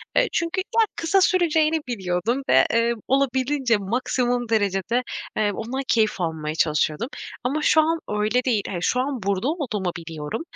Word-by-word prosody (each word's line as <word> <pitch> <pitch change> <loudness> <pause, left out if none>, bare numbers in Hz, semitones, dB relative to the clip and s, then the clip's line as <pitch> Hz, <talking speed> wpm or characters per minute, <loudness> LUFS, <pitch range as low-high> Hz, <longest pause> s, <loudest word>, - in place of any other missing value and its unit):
Eee, - - +4
çünkü 340 +3 0 0.2
ya 445 - +6
kısa 335 +4 +2
süreceğini 320 -4 +3
biliyordum 205 +3 -1
ve, - - +6
eee, 230 +1 +3
olabildiğince, 265 -2 +1
maksimum 240 +3 -1
derecede, 210 +2 +1 0.3
eee, 210 -1 +2
ondan 240 +6 -4
keyif 215 -4 +2
almaya 160 -2 -3
çalışıyordum. 155 +5 +1 0.4
Ama 285 +5 -1
şu 315 +1 +5
an 325 +1 0
öyle 215 +4 +1
değil. 225 -6 +1
Eee, 190 - -4
şu 250 +8 +1
an 260 -5 -3
burada 200 +5 0
olduğumu 225 - -2
biliyorum. 160 - -5
235 Hz, 155 wpm, -23 LUFS, 195-275 Hz, 0.4 s, ya